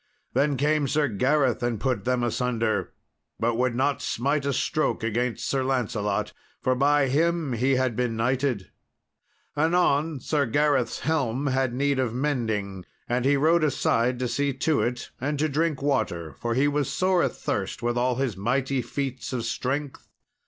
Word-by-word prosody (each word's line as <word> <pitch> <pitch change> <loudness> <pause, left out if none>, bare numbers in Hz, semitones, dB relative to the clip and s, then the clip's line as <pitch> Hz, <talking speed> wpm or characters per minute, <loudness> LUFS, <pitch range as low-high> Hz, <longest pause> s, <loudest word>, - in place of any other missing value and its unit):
Then 140 -1 +2
came 150 +1 +2
Sir 145 +2 +2
Gareth 130 +3 +1
and 120 -3 -1
put 125 +2 -1
them 125 -1 +1
asunder, 115 -2 0 0.5
but 115 +1 +1
would 125 +1 0
not 135 +3 +1
smite 140 +4 -1
a - - +2
stroke 155 0 0
against 115 +2 -1
Sir 135 -1 0
Lancelot, 105 -5 -1 0.3
for 130 - +1
by 140 +2 +3
him 160 +1 +1
he 130 +4 +2
had 130 -3 0
been 120 -1 -1
knighted. 125 -2 -1 0.8
Anon 160 -2 +2
Sir 145 0 0
Gareth's 140 -1 +1
helm 140 -4 0
had 130 -2 0
need 140 0 +1
of 120 -3 -1
mending, 110 -9 -2 0.2
and 125 +1 0
he 140 +1 +4
rode 160 +3 +3
aside 125 -4 +1
to 125 0 -1
see 140 +3 0
to 145 +3 +1
it 120 0 -3
and 145 +3 -1
to 155 +2 +1
drink 155 -1 -1
water, 90 - -1
for 115 - -3
he 135 +3 +3
was 145 -2 0
sore 185 -1 +2
athirst 100 +3 -2
with 120 0 0
all 125 +1 +1
his 130 -5 -1
mighty 130 +6 0
feats 130 -2 -4
of 120 -2 -2
strength. 140 +2 -3
130 Hz, 165 wpm, -26 LUFS, 120-145 Hz, 0.8 s, he